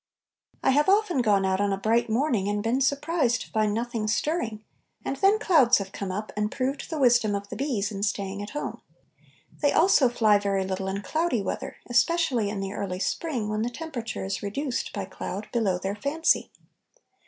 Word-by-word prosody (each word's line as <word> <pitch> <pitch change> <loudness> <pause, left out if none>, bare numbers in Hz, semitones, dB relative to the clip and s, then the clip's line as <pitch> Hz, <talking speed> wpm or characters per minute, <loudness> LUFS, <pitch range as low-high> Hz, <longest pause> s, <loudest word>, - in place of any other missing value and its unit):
I - - +4
have 295 +6 +3
often 390 -8 +3
gone 205 -4 +3
out 190 +1 +1
on 205 0 +1
a 195 - 0
bright 230 +4 +1
morning 225 -4 +1
and 205 0 -1
been 240 +4 +1
surprised 280 -2 +1
to - - -9
find 215 -2 +1
nothing 230 0 -2
stirring, 225 -2 -1 0.4
and 275 - -1
then 390 +7 +4
clouds 310 - +5
have 195 -1 -5
come 195 -2 -4
up 210 +3 -4
and 210 0 -1
proved 270 +2 -2
the 320 - -3
wisdom 240 -6 +4
of 200 0 -5
the - - -6
bees 225 -6 -1
in 200 -1 -5
staying 200 -1 -2
at 205 - -6
home. 295 - -5 0.8
They 290 -1 +3
also 320 -7 +5
fly 215 -4 +4
very 195 -1 0
little 190 0 -3
in 195 +1 -3
cloudy 310 - 0
weather, - - -4
especially 245 -3 +2
in 200 -1 -3
the 195 0 -4
early 195 -3 -3
spring, 250 - -2
when 215 0 -1
the 235 - 0
temperature 245 -7 -5
is 195 0 -3
reduced 245 +6 -3
by 200 -3 -4
cloud 195 +2 -6
below 210 -6 +1
their 195 +2 -3
fancy. 285 +9 +1
225 Hz, 195 wpm, -26 LUFS, 200-275 Hz, 0.8 s, clouds